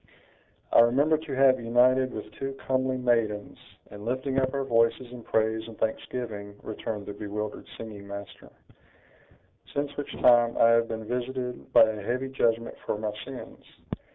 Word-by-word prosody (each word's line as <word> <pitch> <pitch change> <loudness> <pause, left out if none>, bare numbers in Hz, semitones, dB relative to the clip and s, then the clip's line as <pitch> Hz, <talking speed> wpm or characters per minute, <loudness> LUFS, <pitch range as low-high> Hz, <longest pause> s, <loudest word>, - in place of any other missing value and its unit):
"I - - +7
remember 135 +7 +5
to 155 -3 -5
have 130 -1 +5
united 125 +2 +3
with 105 - -7
two 135 0 -5
comely 130 -1 -1
maidens, 115 -4 0 0.3
in 105 0 -9
lifting 130 +3 -1
up 130 0 +1
our 140 0 -1
voices 120 0 +1
in 125 -1 -9
praise 110 0 0
and 115 - -11
thanksgiving," 110 -2 -4
returned 105 -1 -5
the 105 - -6
bewildered 105 +1 -5
singing 105 -3 -8
master; 100 0 -9 1.2
"since 145 0 -2
which 145 - -4
time 120 -1 +4
I 115 - +6
have 115 0 +4
been 110 -1 -5
visited 125 +1 -4
by - - +8
a 110 -1 0
heavy 130 +6 -2
judgment 115 -3 0
for - - -2
my 105 0 -2
sins. 135 -2 -9
120 Hz, 155 wpm, -27 LUFS, 110-130 Hz, 1.2 s, by